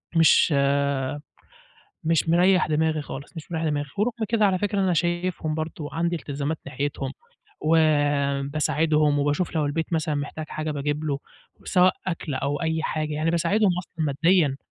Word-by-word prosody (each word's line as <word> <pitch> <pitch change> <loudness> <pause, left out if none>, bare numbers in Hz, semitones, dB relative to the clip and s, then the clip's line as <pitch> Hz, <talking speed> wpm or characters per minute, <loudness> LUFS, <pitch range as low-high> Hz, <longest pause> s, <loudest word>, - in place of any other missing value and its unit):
مش 165 0 +5 1.5
مش 165 0 +1
مريّح 180 +2 +4
دماغي 155 0 +1
خالص، 140 +5 -9
مش 160 +2 -9
مريّح 165 0 -1
دماغي، 145 -2 -1
ورغم 225 +4 +2 0.2
كده 225 -2 +3
على 190 -2 +1
فكرة 205 +1 0
أنا 190 -2 +2
شايفهم 175 -1 -1
برضه 155 -1 -4
عندي 170 +1 0
إلتزامات 145 0 -3
ناحيتهم، 140 0 -3 0.5
وباساعدهم 150 0 +2
وباشوف 145 +5 0
لو 150 -2 +1
البيت 160 +4 -2
مثلًا 155 -1 0
محتاج 145 +2 -4
حاجة 155 0 -4
باجيب 145 +1 -2
له 145 -3 -1 0.5
سواء 185 0 +4
أكْل 165 -5 -3
أو 140 +2 -2
أي 160 -1 0
حاجة، 155 -1 -2
يعني 155 +2 0
باساعدهم 200 +5 +2
أصلًا 170 -2 -4
ماديًا. 150 0 +2
155 Hz, 145 wpm, -24 LUFS, 145-170 Hz, 1.5 s, مش